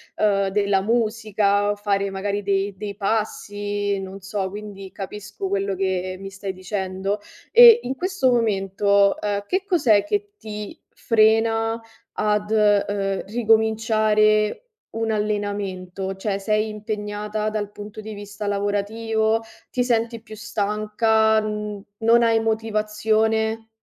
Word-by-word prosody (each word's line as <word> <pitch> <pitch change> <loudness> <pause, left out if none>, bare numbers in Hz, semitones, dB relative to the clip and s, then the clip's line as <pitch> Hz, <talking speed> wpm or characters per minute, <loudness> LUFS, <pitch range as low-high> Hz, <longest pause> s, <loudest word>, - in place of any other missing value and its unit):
uhm, 200 -2 +2
della 200 0 +1
musica 215 -2 +1
o - - -2
fare 200 -1 0
magari 200 +1 -2
dei 200 0 0
dei 200 0 -5
passi, 205 -1 -2
non 195 +1 -8
so, 195 0 -3
quindi 200 -1 -9
capisco 200 0 -6
quello 195 0 -1
che 185 -1 -1
mi 195 0 -7
stai 195 0 -6
dicendo 190 +1 -3 0.3
e, 475 -1 +9
in 260 - -3
questo 365 -5 +1
momento, 200 -3 +2
uhm, - - -14 0.2
che 375 +1 0
cos'è 265 - +3
che 410 +4 -2
ti 210 -1 -7 0.2
frena 225 0 +2 0.3
ad, 210 0 0
uhm, 205 -2 +2
ricominciare 215 - +2 0.4
un 225 0 -1
allenamento, 200 -3 -3
cioè 195 0 -2
sei 215 +2 0
impegnata 210 0 -3
dal 210 -1 -3
punto 205 +1 -9
di 215 0 -7
vista 205 +1 -7
lavorativo, 220 +2 0 0.3
ti 250 - +1
senti 230 -1 0
più 220 -1 -11
stanca, 215 +1 +1
mhmm, 210 -1 -4 0.2
non 230 +1 +5
hai 225 -1 +3
motivazione? 220 0 0
210 Hz, 125 wpm, -23 LUFS, 200-220 Hz, 0.4 s, e